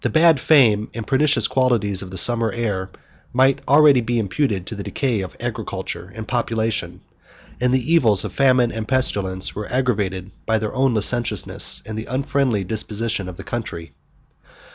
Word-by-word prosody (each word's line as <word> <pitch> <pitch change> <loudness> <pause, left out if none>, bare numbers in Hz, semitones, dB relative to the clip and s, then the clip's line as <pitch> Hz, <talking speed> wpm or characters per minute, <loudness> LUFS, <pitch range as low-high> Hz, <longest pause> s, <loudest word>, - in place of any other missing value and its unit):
The - - +1
bad 160 -2 +4
fame 115 -9 +4
and 115 -2 -5
pernicious 145 +2 +2
qualities 115 -7 +1
of 95 - -8
the 95 - -7
summer 115 +5 +3
air 100 -5 -3 0.4
might 130 +2 +3
already 145 -2 +6
be 120 +1 -1
imputed 105 -2 -1
to 110 - -7
the 100 - -6
decay 120 0 -1
of 95 - -8
agriculture - - -5
and 110 -1 -7
population; 115 -2 -2 0.6
and 125 0 +1
the 130 +5 +1
evils 110 - +3
of - - -6
famine 130 -3 +3
and 110 -1 -5
pestilence 100 -8 0
were 105 0 -6
aggravated 100 -7 -1 0.2
by 110 - +2
their 110 -1 -3
own 130 -2 +1
licentiousness, 120 +3 0
and 110 0 -5
the 110 - -7
unfriendly 130 -4 0
disposition 110 0 -2
of 90 - -10
the - - -8
country. 85 -8 -6
115 Hz, 165 wpm, -21 LUFS, 105-130 Hz, 0.6 s, already